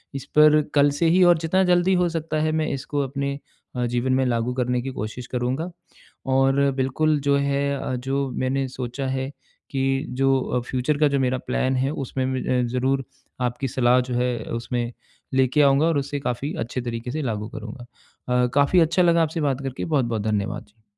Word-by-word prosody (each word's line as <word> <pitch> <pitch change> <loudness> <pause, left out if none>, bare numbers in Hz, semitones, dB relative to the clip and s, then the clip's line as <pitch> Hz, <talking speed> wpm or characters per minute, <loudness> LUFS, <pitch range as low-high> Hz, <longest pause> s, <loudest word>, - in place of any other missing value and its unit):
इस 135 - -5
पर 150 0 +7
कल 145 0 +5
से 165 -1 +3
ही 180 +2 +5
और 175 -2 +6
जितना 165 +4 +1
जल्दी 180 +1 +3
हो 175 - +1
सकता 160 -1 -2
है 155 - +1
मैं 155 - -1
इसको 140 +2 -3
अपने 140 +1 -3 0.4
अ, 125 -1 0
जीवन 120 +2 0
में 130 0 +2
लागू 120 0 0
करने 125 -1 0
की 135 - -4
कोशिश 110 +3 -5
करूँगा। 130 +8 -2 0.6
और 135 +1 +3 0.2
बिल्कुल 145 +3 +1
जो 140 - +4
है 140 0 0
अ, 130 - -3
जो 135 +2 -2
मैंने 130 +2 -1
सोचा 130 +1 -5
है 130 +1 -2 0.4
कि 135 +1 0
जो 135 +1 +2
अ, 125 - -1
फ्यूचर 130 +3 0
का 150 -1 +4
जो 140 -1 +1
मेरा 130 0 +1
प्लान 130 0 0
है 130 +1 +1 0.2
उसमें 130 +1 -2
मैं 130 -1 0
ज़रूर 130 +2 0 0.4
आपकी 125 +2 -1
सलाह 125 0 +3
जो 125 0 -5
है, 125 0 0
उसमें 120 0 -3 0.4
लेके 135 +3 +3
आऊँगा 140 +2 +4
और 165 -3 +2
उसे 140 +1 -2
काफ़ी 135 +3 -3
अच्छे 120 +2 -3
तरीके 120 0 -4
से 155 +2 -3
लागू 110 -4 -3
करूँगा। 115 +3 -8 0.6
अ, - - +3
काफ़ी 145 +5 +4
अच्छा 170 +3 +3
लगा 170 -1 +4
आपसे 160 +1 -2
बात 140 -2 0
करके, 135 -1 -4
बहुत-बहुत 120 -8 0
धन्यवाद। 105 -1 -2
जी। 110 +1 -31
135 Hz, 195 wpm, -23 LUFS, 125-145 Hz, 0.6 s, पर